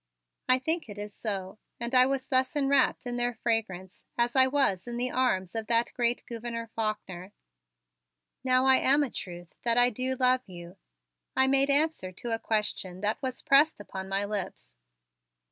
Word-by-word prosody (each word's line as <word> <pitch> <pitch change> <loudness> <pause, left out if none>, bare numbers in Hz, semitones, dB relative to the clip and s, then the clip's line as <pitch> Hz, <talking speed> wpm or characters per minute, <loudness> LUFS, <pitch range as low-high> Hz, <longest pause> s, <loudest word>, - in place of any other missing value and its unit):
I 255 - +6
think 320 +1 -2
it 205 - -9
is 205 0 -6
so, 195 -2 -4 0.2
and 235 +1 -3
I 255 0 +6
was 270 -1 -2
thus 260 +2 +2
enwrapped 275 -2 +2
in 245 0 -3
their 240 0 -1
fragrance 210 -5 -3
as 240 +1 +1
I 260 0 +6
was 260 -9 +1
in 240 0 -5
the 250 +1 -1
arms 190 -8 0
of 225 -1 -4
that 230 0 +1
great 240 0 0
Gouverneur 230 -1 -6
Faulkner. 205 -4 -4 1.1
"Now 255 0 +3
I 265 0 +6
am 285 +3 +3
a 265 - -4
truth 175 -1 -8
that 235 0 +1
I 245 0 +5
do 255 +3 -2
love 255 0 +3
you," 175 0 -11 0.6
I 265 - +4
made 275 +1 +3
answer 285 -9 +1
to 230 +5 -5
a 225 - -1
question 210 -5 -2
that 210 +5 -1
was 260 -2 -4
pressed 285 +1 +4
upon 190 -2 -8
my 195 +1 -1
lips. 195 - -5
235 Hz, 180 wpm, -28 LUFS, 205-260 Hz, 1.1 s, I